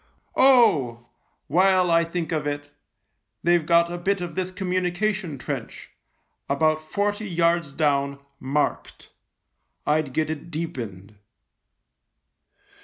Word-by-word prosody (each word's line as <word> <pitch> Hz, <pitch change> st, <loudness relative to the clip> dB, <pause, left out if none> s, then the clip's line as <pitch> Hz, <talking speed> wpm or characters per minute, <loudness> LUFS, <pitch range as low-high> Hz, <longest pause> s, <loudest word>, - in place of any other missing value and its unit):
Oh! 150 Hz, -, +4 dB, 0.4 s
while 185 Hz, +2 st, +3 dB
I 165 Hz, 0 st, +4 dB
think 170 Hz, 0 st, -4 dB
of 155 Hz, -2 st, -1 dB
it, 145 Hz, 0 st, -4 dB, 0.7 s
they've 175 Hz, -1 st, +3 dB
got 170 Hz, +1 st, +3 dB
a 175 Hz, -, -4 dB
bit 195 Hz, +2 st, 0 dB
of 175 Hz, -2 st, -5 dB
this 185 Hz, +1 st, -2 dB
communication 185 Hz, -1 st, -1 dB
trench, -, -, -6 dB, 0.6 s
about 155 Hz, +2 st, +2 dB
forty 205 Hz, +6 st, -2 dB
yards 170 Hz, -3 st, +1 dB
down, 140 Hz, -1 st, 0 dB, 0.2 s
marked. 140 Hz, +3 st, -2 dB, 0.7 s
I'd 150 Hz, -2 st, +1 dB
get 155 Hz, +3 st, 0 dB
it 155 Hz, +2 st, -7 dB
deepened." 110 Hz, -, -6 dB
165 Hz, 110 wpm, -24 LUFS, 145-180 Hz, 0.7 s, Oh